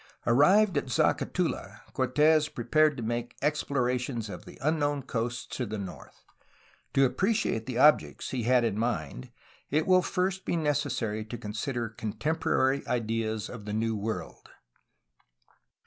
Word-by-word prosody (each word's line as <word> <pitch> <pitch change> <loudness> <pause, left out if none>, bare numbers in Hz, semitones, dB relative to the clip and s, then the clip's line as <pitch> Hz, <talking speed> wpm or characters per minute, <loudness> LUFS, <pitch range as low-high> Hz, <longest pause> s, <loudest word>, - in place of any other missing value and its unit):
Arrived 175 - +5
at 135 - -8
Zacatula, 115 - 0
Cortes 150 +4 +3
prepared 150 +5 +2
to 120 - -4
make 120 +1 -3
explorations 125 -6 -1
of - - -9
the - - -12
unknown 145 -2 0
coasts 120 -1 -3
to 130 - -2
the 110 -2 -4
north. 95 -3 -9 0.7
To 135 - +6
appreciate 190 - 0
the 125 -2 -3
objects 150 +4 +3
he 130 - -2
had 125 +1 +3
in 110 -3 0
mind 80 - -3 0.4
it 155 +2 +1
will 185 -1 +5
first 185 +1 -1
be - - -1
necessary 145 -9 -1
to 120 +2 -6
consider 115 +3 -3
contemporary 130 +4 0
ideas 115 -2 -1
of 110 -4 -9
the 105 - -4
New 110 +1 0
World. 105 -4 -5
125 Hz, 135 wpm, -28 LUFS, 110-150 Hz, 0.7 s, To